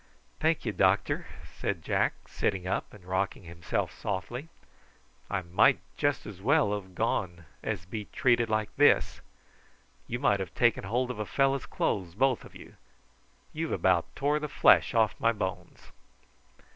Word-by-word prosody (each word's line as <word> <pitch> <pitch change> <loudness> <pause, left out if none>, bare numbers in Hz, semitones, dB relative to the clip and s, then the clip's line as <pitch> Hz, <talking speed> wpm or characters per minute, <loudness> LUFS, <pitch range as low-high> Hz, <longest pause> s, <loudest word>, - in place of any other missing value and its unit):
"Thank 160 -2 +1
ye, 110 - 0
doctor," 95 0 +1 0.3
said 85 -5 -2
Jack, - - -1
sitting 95 -3 -1
up 95 - -2
and 100 -4 -15
rocking 95 +1 -2
himself 85 -1 -3
softly. 120 - -4 0.8
"I 100 -2 -1
might 85 +1 +4 0.2
just 145 -1 0
as 100 -3 -9
well 140 -2 +3
have 95 -3 -6
gone 85 -3 -1 0.2
as 85 - -3
be 105 +3 -5
treated 120 -1 +2
like 110 -1 -1
this. - - +4 0.9
You 120 - -2
might 120 -6 +2
have 95 -3 -5
taken 120 -4 +2
hold 125 +5 0
of 115 - -7
a 105 - -2
fellow's 135 -1 +1
clothes, 90 -4 -2
both 130 +2 +2
of - - -14
you. - - -13 0.8
You've 160 +1 -2
about 90 -3 +2
tore 145 +2 +1
the 150 0 -4
flesh - - +5
off 110 -2 +3
my 115 - +3
bones." 95 -4 -6
105 Hz, 155 wpm, -29 LUFS, 95-125 Hz, 0.9 s, flesh